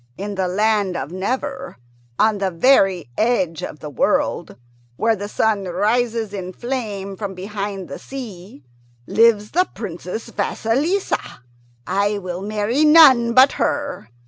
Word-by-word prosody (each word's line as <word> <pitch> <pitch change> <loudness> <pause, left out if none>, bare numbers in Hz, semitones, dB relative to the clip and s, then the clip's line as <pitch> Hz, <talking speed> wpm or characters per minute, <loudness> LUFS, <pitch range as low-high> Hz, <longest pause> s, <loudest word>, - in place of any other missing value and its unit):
In 205 +2 -4
the 190 -2 -1
land 205 -1 +1
of 135 +4 -5
Never, 260 - -4 0.4
on 215 -1 +2
the 195 -1 0
very 185 - +3
edge 190 -9 +1
of 150 - -7
the 150 - -6
world, - - 0 0.4
where 225 - +1
the 205 0 -6
red - - -8
sun 210 -2 0
rises 220 +4 0
in 185 -2 -5
flame 210 -5 -4
from 195 -1 -5
behind 195 0 -5
the - - -8
sea, 200 - -9 0.4
lives 220 - +3
the 365 +3 +1
Princess 185 +1 -6
Vasilissa. 290 - -1 0.4
I 205 +1 0
will 180 -2 -5
marry 215 +7 0
none 275 -7 +7
but 260 +2 +7
her. 285 - -2
210 Hz, 140 wpm, -20 LUFS, 190-240 Hz, 0.4 s, none